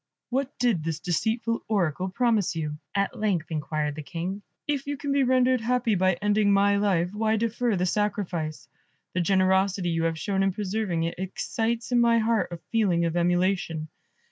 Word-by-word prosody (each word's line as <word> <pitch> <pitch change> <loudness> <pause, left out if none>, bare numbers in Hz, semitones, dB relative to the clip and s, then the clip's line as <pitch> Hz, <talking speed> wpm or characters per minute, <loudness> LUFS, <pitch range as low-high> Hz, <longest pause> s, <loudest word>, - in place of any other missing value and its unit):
"What 270 +2 -2
did 235 -10 +1
this 160 -1 -2
deceitful 225 +6 -1
Oracle 185 -3 0
promise 220 -3 +1
you?" 150 -2 -3 0.2
at 200 -1 0
length 185 -7 0
inquired 150 -1 -2
the 155 - -6
King. 180 +6 -5 0.3
"If 285 -2 -1
you 285 0 -2
can 285 0 -3
be 280 0 +3
rendered 255 -1 +3
happy 240 -1 +1
by 185 0 +3
ending 205 +2 +2
my 200 0 +4
life, 185 -3 +1
why 220 +1 +1
defer 230 +1 0
the 180 0 0
sacrifice? 175 - -2 0.5
The 180 - +1
generosity 190 0 +2
you 165 0 0
have 165 -1 0
shown 195 +3 -1
in 195 -1 +2
preserving 195 -4 -1
it, 170 +1 -3
excites 225 +5 -2
in 245 - +4
my 235 0 +4
heart 225 -2 +2
a 170 - -5
feeling 190 -7 +2
of 165 0 -1
emulation. 175 -2 0
195 Hz, 175 wpm, -26 LUFS, 175-225 Hz, 0.5 s, my